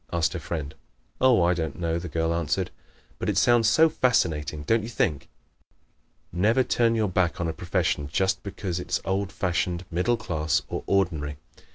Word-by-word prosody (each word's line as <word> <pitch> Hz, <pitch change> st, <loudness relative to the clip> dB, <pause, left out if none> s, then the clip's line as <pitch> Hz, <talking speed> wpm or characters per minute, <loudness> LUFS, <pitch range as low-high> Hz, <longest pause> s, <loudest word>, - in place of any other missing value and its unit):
asked 85 Hz, -2 st, +1 dB
her -, -, -3 dB
friend. 75 Hz, -4 st, -5 dB, 0.5 s
"Oh, 125 Hz, -8 st, +5 dB
I 85 Hz, +1 st, +3 dB
don't 80 Hz, -4 st, -4 dB
know," 85 Hz, -1 st, -1 dB
the 90 Hz, -, -6 dB
girl 80 Hz, +1 st, 0 dB
answered, 85 Hz, -3 st, -1 dB, 0.5 s
"but -, -, -2 dB
it 100 Hz, -, 0 dB
sounds 115 Hz, +1 st, +4 dB
so 160 Hz, +8 st, +6 dB
fascinating, 80 Hz, -, 0 dB
don't 115 Hz, +8 st, +2 dB
you 110 Hz, -, -6 dB
think?" 75 Hz, -, -1 dB, 1.1 s
Never 110 Hz, +9 st, +3 dB
turn 115 Hz, -1 st, +2 dB
your 110 Hz, -2 st, +1 dB
back 90 Hz, -2 st, 0 dB
on 85 Hz, -, -1 dB
a 80 Hz, -, -2 dB
profession 75 Hz, -4 st, -1 dB
just 95 Hz, +4 st, +1 dB
because 95 Hz, -3 st, -4 dB
it -, -, -8 dB
is -, -, +1 dB
old 95 Hz, +1 st, -1 dB
fashioned, 90 Hz, -1 st, -1 dB
middle 90 Hz, +8 st, +1 dB
class 80 Hz, -9 st, -1 dB
or -, -, -3 dB
ordinary. 80 Hz, -7 st, 0 dB
90 Hz, 180 wpm, -26 LUFS, 80-105 Hz, 1.1 s, so